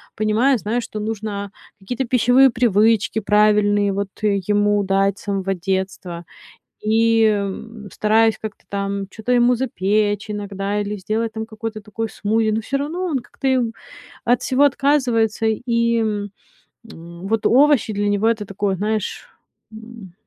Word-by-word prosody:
понимаю, 220 +5 +2
знаю, 225 +4 -2
что 215 - -7
нужно 210 -2 -4 0.3
какие-то 245 +6 -3
пищевые 250 +2 +5
привычки 220 -2 +2
правильные, 205 -1 +3
вот, 200 0 -2 0.2
э, 200 -2 +2
ему 205 0 +2
дать 195 +1 +1
с - - -14
самого 195 -1 -1
детства. 185 -2 -4 0.6
И 220 -1 +3 0.5
стараюсь 220 +1 +2
как-то 215 -1 -8
там 200 0 -3
чё-то 225 +4 -4
ему 245 0 +4
запечь 210 -3 0
иногда 205 0 -3
или 205 +1 -3
сделать 220 +3 -2
там 220 0 -3
какой-то 220 -1 -6
такой 220 +2 -4
смузи, 220 +1 0
но 220 +1 -1
всё 275 +4 -2
равно 320 +6 -3
он 295 -6 0
как-то, 265 +2 -5
э, 260 -1 +3 0.6
от 245 +1 +2
всего 265 +2 +1
отказывается. 255 -6 +1
И, 235 +1 +1
м, 205 -2 -2 1.0
вот 225 -1 0
овощи 275 -3 +4
для 205 0 0
него- 205 +2 +2
это 220 -2 0
такой, 195 -1 -2
знаешь, 215 +1 -3 0.4
м 220 -4 -11
215 Hz, 140 wpm, -20 LUFS, 205-230 Hz, 1.0 s, пищевые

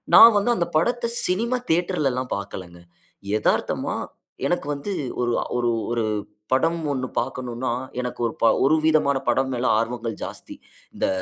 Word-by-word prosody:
நான் 230 -1 +10
வந்து 205 +4 +1
அந்த 170 -4 0
படத்த 235 +8 +1 0.2
சினிமா 230 +7 +1
தியேட்டர்ல 170 -3 +1
எல்லாம் 125 0 -4
பாக்கலங்க. 90 -3 -8 0.6
எதார்த்தமா - - 0 0.5
எனக்கு 175 -4 -1
வந்து 140 +8 -5 0.3
ஒரு 120 0 +1 0.3
ஒரு 120 -1 +1 0.2
ஒரு 120 -1 0 0.5
படம் 165 +6 +2
ஒண்ணு 130 -2 -2
பாக்கணுனா, 125 -1 -2 0.3
எனக்கு 125 -1 -5
ஒரு, 115 - -5 0.3
ஒரு 155 - +5
ப 155 - 0
விதமான 150 -3 +3
படம் 130 +2 +2
மேல 125 +1 -2
ஆர்வங்கள் 115 -1 -3
ஜாஸ்தி. - - -7 0.4
இந்த - - -1
135 Hz, 145 wpm, -23 LUFS, 120-170 Hz, 0.6 s, நான்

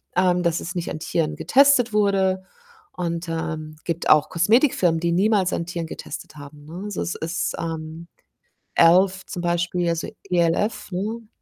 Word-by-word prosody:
ähm, 180 -1 +3
dass 170 0 0
es 185 +3 -6
nicht 175 -1 -3
an - - -5
Tieren 160 0 -1
getestet 250 - +4
wurde 190 -2 +2 0.5
und, 170 -1 -3
ähm, 155 -1 -4
gibt 170 -1 -2
auch 150 -1 +5
Kosmetikfirmen, 180 - +3
die 170 - +1
niemals 190 +1 +2
an 170 - -2
Tieren 170 -1 -4
getestet 150 -1 -8
haben, 145 +1 -12
ne? 170 +5 -8
Also, 210 - -4
es 175 - -3
ist, 165 +2 -2
ähm, 160 0 -5 0.7
e.l.f. 185 +3 +5
zum 175 - -6
Beispiel, 175 0 0
also 170 -1 -2 0.2
E-L-F, 180 +5 0
ne? 215 +5 -4
175 Hz, 160 wpm, -23 LUFS, 165-190 Hz, 0.7 s, auch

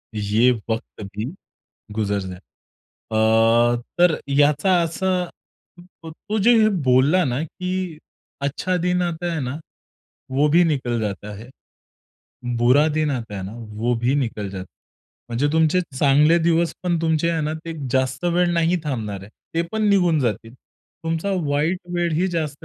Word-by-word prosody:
ये 105 +4 +3 0.2
वक्त 110 -1 -4
भी 105 +2 -2 0.7
गुजर 105 -1 -1
जाय 95 -1 -7 0.8
अ, 115 +2 +4 0.2
तर 175 -2 +5
याचा 145 +5 +3
असं, 180 +2 -1 0.8
तो 205 +7 -4
जे 225 +4 +5
हे 215 - +5 0.2
बोलला 135 +8 +4
ना, 130 +1 -1
की 180 0 -4 0.4
"अच्छा 160 +6 -1
दिन 180 +1 +1
आता 175 0 -2
है 160 - -2
ना, 135 +4 -4 0.7
वो 145 +3 +3
भी 170 +4 +5
निकल 125 -7 0
जाता 105 0 -4
है. 115 +5 -11 1.1
बुरा 130 +5 +5
दिन 155 -1 +1
आता 115 -5 -5
है 95 - -5
ना, 100 +3 -7
वो 115 +1 -2
भी 130 +3 +3
निकल 115 -7 -2
जाता 95 -1 -6
है." - - -38
म्हणजे 125 +5 +1
तुमचे 160 +2 +3 0.2
चांगले 150 +4 +5
दिवस 170 0 +1
पण 175 -2 0
तुमचे 160 0 +1
आहे 165 -1 0
ना, 155 +1 -2
ते 165 +1 -7 0.2
जास्त 130 +3 0
वेळ 175 0 +2
नाही 170 +1 +2
थांबणार 110 -9 -3
आहे. 100 - -13 0.2
ते 165 - +2
पण 220 0 -1
निघून 175 -6 +3
जातील. 115 -1 -2
तुमचा 165 +7 -6 0.2
वाईट 155 +6 0
वेळ 175 -1 0
ही 175 +4 +1
जास्त 155 -5 -3
150 Hz, 155 wpm, -22 LUFS, 120-170 Hz, 1.1 s, तर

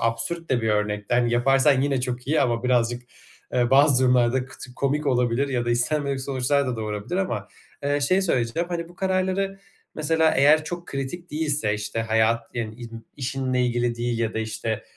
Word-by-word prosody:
absürt 115 +9 -2
de 120 -3 +1
bir 110 - 0
örnekti. 105 +1 0
Hani, 120 -1 +2
yaparsan 135 +3 +4
yine 135 -1 0
çok 125 0 -4
iyi 155 +3 +2
ama 120 -1 +1
birazcık, 120 -1 +1 0.5
eee, 120 -1 +1
bazı 135 -1 +5
durumlarda 125 0 +2
kıtı 125 -2 -11
komik 145 +3 -1
olabilir 125 +1 +1
ya 125 -3 -1
da 120 - -1
istenmedik 140 +3 0
sonuçlar 135 +1 0
da 125 -2 -2
doğurabilir 110 - -4
ama. 190 -1 -2 0.4
Eee, 145 0 +1
şey 185 +8 +2
söyleyeceğim, 165 +1 0
hani, 170 -1 -4
bu 175 - -16
kararları 190 +1 -1 0.4
mesela 160 +1 +2
eğer 150 +3 +5
çok 175 +2 -6
kritik 140 +6 -5
değilse, 150 -8 0
işte, 105 +2 -3
hayat, 110 +1 +2
yani, 110 -3 -3
in 115 -1 -10
işinle 130 -2 -1
ilgili 120 0 0
değil 120 0 -2
ya 115 -1 -1
da, - - -1
işte, 110 0 -3
125 Hz, 180 wpm, -24 LUFS, 115-150 Hz, 0.5 s, bazı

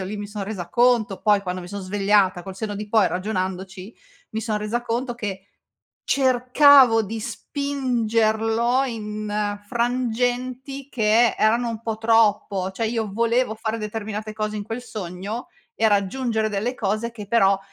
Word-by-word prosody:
io 190 - -3
lì 205 +3 -5
mi 205 - -5
son 205 -1 -5
resa 190 -5 -5
conto 235 -4 +2
poi 205 -1 +3
quando 180 -1 -4
mi 175 - -9
son 200 +1 -5
svegliata, 195 -1 +2
col 190 -1 -8
senno 205 0 -4
di 210 +1 -6
poi 210 -3 +4
ragionandoci, 190 +1 -4 0.4
mi 220 - -3
son 220 -2 -1
resa 220 +3 -2
conto 240 +1 -2
che 200 -4 -5 0.6
cercavo 255 -2 +5
di 220 +2 -5
spingerlo 235 -2 0
in 210 -3 -3
frangenti, 250 +2 -1
che 225 -1 +3
erano 235 +2 +3
un 230 0 -5
po' 225 -1 -3
troppo. 215 -4 +2
Cioè 225 +3 -2
io 220 -3 -2
volevo 235 +1 +1
fare 220 +1 -3
determinate 215 0 -5
cose 215 0 -3
in 205 - -3
quel 225 +4 -5
sogno 210 - -6 0.3
e 225 - +3
raggiungere 220 +2 0
delle 215 +5 -2
cose, 215 +1 -1
che 210 -3 -8
però 195 -3 +4
220 Hz, 155 wpm, -23 LUFS, 205-240 Hz, 0.6 s, cercavo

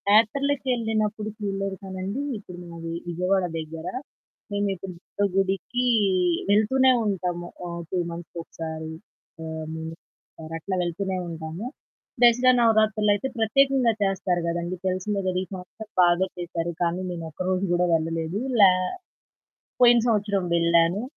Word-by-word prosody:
యాత్రలకెళ్ళినప్పుడు 225 -3 +1
చూడలేదు 195 -2 -2
కానండీ 190 +6 -4 0.2
ఇప్పుడు 180 -4 -11
మాది 165 -1 -7 0.2
విజయవాడ 180 +2 +1
దగ్గర, 160 +1 -6 0.7
మేమెప్పుడు 195 -2 -2 0.3
దుర్గ 205 - +4
గుడికి 195 +6 0 0.7
వెళ్తూనే 260 +6 +5
ఉంటాము, 180 -3 -2 0.2
ఆహ్, 170 0 -5
2 185 - -2
మంత్స్‌కి 170 0 -8
ఒకసారి, 160 -1 -6 0.5
హ్మ్. 160 0 -5 0.8
అట్లా 185 +4 -3
వెళ్తూనే 185 +2 -2
ఉంటాము. 165 +4 -6 0.6
దసరా 245 +1 +6
నవరాత్రులయితే 215 -1 +3
ప్రత్యేకంగా 260 +1 +3
చేస్తారు 190 -2 +1
గదండీ 170 +2 -2
తెలిసిందే 190 +2 -1
గదా! 180 0 0
ఈ - - -17
సంవత్సరం 190 +4 -9 0.2
బాగా 175 +2 +3
చేసారు, 170 -1 -3
కానీ 175 +1 0
నేను 165 -1 -5
ఒక్కరోజు 185 +4 -1
కూడా 175 0 +3
వెళ్ళలేదు. 165 +4 -1 0.2
లే 190 - +10 1.1
పోయిన 240 -1 +8
సంవత్సరం 205 -3 +1
వెళ్ళాను. 170 +3 +3
190 Hz, 115 wpm, -25 LUFS, 170-215 Hz, 1.1 s, లే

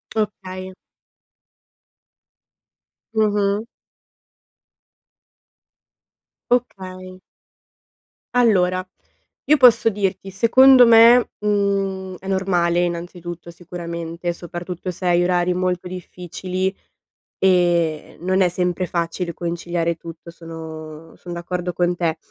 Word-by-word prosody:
Okay. 190 -3 -4 2.4
Mh-mh. 205 -1 +1 2.9
Okay. 185 -6 -3 1.1
Allora, 185 -6 +3 0.6
io 305 +1 +4
posso 245 -3 +6
dirti: 195 -1 -3
secondo 250 +4 +6
me, 230 +1 +7
mhmm, 195 -2 -1
è 190 - -11
normale, 180 -3 +1
innanzitutto, 175 0 -4
sicuramente, 170 0 -5
soprattutto 175 +1 -7
se 180 +1 -8
hai 175 0 +3
orari 180 0 +1
molto 180 0 -2
difficili, 185 +1 -4 0.6
ehm, 175 -4 +1
non 185 +1 +1
è 180 - +4
sempre 180 0 -1
facile 170 0 -3
conciliare 170 -1 -2
tutto, 165 0 -11
sono 160 -1 -10
sono 175 -1 -8
d'accordo 180 +1 -4
con 175 0 +1
te. 170 -2 -1
180 Hz, 85 wpm, -21 LUFS, 170-195 Hz, 2.9 s, me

